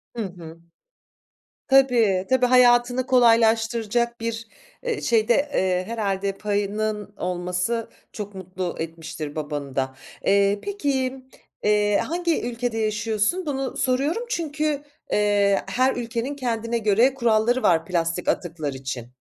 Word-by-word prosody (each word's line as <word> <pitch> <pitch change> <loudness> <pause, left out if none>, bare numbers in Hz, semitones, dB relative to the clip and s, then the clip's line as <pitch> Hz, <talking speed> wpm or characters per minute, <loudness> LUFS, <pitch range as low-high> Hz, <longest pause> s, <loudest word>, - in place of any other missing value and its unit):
Hı 230 - -2
hı. 170 -4 -9 1.1
Tabii, 235 -8 +4
tabii, 260 -1 +4
hayatını 245 0 +4
kolaylaştıracak 230 -1 +3
bir, 230 0 -4 0.3
eee, 475 -3 -2
şeyde, 230 0 +3 0.2
eee, 185 -1 +1
herhâlde 200 -3 -1
payının 210 0 -2
olması 180 +5 -2 0.2
çok 205 -2 -7
mutlu 185 -1 -5
etmiştir 160 -2 -6
babanı 145 -3 -4
da. 130 0 -1 0.3
Eee, 200 0 +3
peki 285 -11 -1
m 265 0 -12 0.5
eee, 210 0 +3
hangi 340 0 -1
ülkede 235 -1 -3
yaşıyorsun? 215 - 0
Bunu 270 -3 -3
soruyorum 275 - 0
çünkü, 305 - -1 0.3
eee, 205 -1 +3
her 255 +1 +1
ülkenin 240 +3 -3
kendine 235 -3 -2
göre 225 +4 +3
kuralları 235 0 +2
var 165 -1 +3
plastik 170 0 -1
atıklar 160 -5 -1
için. 130 -3 -6
220 Hz, 120 wpm, -24 LUFS, 190-250 Hz, 1.1 s, Tabii